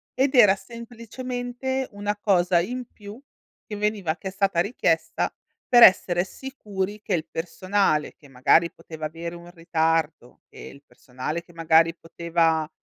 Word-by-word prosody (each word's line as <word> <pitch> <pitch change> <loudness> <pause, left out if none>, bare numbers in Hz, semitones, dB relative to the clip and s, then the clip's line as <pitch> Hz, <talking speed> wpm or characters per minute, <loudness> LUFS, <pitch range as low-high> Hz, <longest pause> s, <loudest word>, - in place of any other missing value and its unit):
ed 265 +2 +1
era 205 -5 +7
semplicemente 245 +3 -5
una 205 0 -3
cosa 180 -4 +2
in 245 +7 -4
più, 205 +2 -11 0.5
che 210 - -7
veniva 205 -6 -1
che 190 - -8
è - - -10
stata 195 -3 0
richiesta 165 -5 0 0.3
per 240 -1 +7
essere 180 -3 +5
sicuri 205 -4 -6
che 205 - -3
il 160 -2 -1
personale 180 -2 -1
che 145 - -19
magari 135 +6 +3
poteva 160 -1 -9
avere 170 +2 -6
un 170 0 -12
ritardo, 165 -5 -1
che - - -18
il 140 - -12
personale 135 +7 -6
che 175 - -20
magari 165 0 +3
poteva, 165 -2 -1
180 Hz, 145 wpm, -24 LUFS, 165-210 Hz, 0.5 s, era